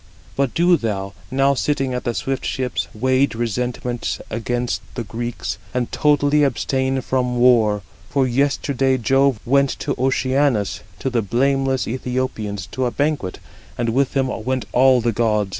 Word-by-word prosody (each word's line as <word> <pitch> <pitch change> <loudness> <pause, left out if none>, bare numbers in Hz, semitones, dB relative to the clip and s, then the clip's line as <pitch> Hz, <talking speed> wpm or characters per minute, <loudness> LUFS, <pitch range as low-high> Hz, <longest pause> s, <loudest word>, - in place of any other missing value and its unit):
But 135 -2 0
do 175 +1 +4
thou, 100 -5 -3 0.2
now 135 +1 +3
sitting 135 -1 0
at 125 - -3
the 120 - -1
swift 135 -1 -2
ships, 125 -3 -2
wage 130 +3 +1
resentment 120 +1 -2
against 120 +2 -2
the 120 - -3
Greeks, 120 +2 -4 0.2
and 125 -2 -1
totally 150 0 +3
abstain 130 +1 0
from 125 -1 -1
war. 115 -5 +4 0.3
For 135 -2 +2
yesterday 135 0 +1
Jove 135 0 +2
went 140 +2 +3
to - - -2
Oceanus, 130 -3 +1
50 - - -18 0.2
to 135 - 0
the 120 -2 +1
blameless 135 +4 +1
Æthiopians, 115 -6 -3
to 130 - -1
a - - -2
banquet, 145 -11 -1 0.4
and 120 -1 0
with 135 +4 +1
him 135 - +3 0.2
went 130 +1 -1
all 130 0 +5
the 120 0 +1
gods. 105 -2 +1
125 Hz, 155 wpm, -21 LUFS, 115-135 Hz, 0.4 s, all